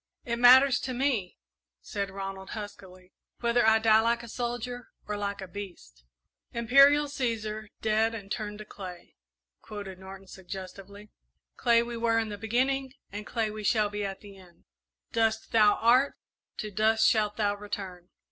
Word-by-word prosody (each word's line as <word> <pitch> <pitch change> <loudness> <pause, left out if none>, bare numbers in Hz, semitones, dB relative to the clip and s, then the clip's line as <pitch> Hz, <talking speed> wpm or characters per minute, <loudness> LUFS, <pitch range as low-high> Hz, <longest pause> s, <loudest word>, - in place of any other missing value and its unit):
"It 235 -1 -2
matters 255 +2 +7
to 255 -1 -4
me," 245 -8 -1 0.4
said 200 -1 -4
Ronald, 195 0 -7
huskily, 185 -3 -9 0.3
"whether 235 0 +2
I 220 0 +5
die 220 0 +5
like 235 +1 0
a - - -9
soldier 245 +1 -4 0.2
or 210 - -2
like 200 -1 -3
a 190 - -6
beast." 175 - -10 0.5
"'Imperial 275 +5 +5
Cæsar, 225 -6 -3 0.2
dead 220 +1 +2
and 200 -2 -9
turned 210 -2 -4
to 215 - -9
clay,'" 185 -4 -10 0.5
quoted 200 -3 -8
Norton, 190 0 -11
suggestively. 195 +2 -10 0.4
"Clay 235 -2 +3
we 235 0 -6
were 230 0 +1
in 225 -1 0
the 205 -1 -7
beginning 260 +4 0 0.2
and 205 +1 -7
clay 225 -3 -1
we 215 0 -7
shall 210 0 +2
be 205 0 -3
at 195 -1 -5
the 200 -2 -13
end. 180 -3 -19 0.5
'Dust 225 -1 0
thou 210 -2 +5
art; 250 +5 +3 0.4
to 215 - -5
dust 220 +2 +3
shalt 210 -2 +1
thou 205 -2 +1
return.'" 190 -3 -7
215 Hz, 160 wpm, -28 LUFS, 200-235 Hz, 0.5 s, matters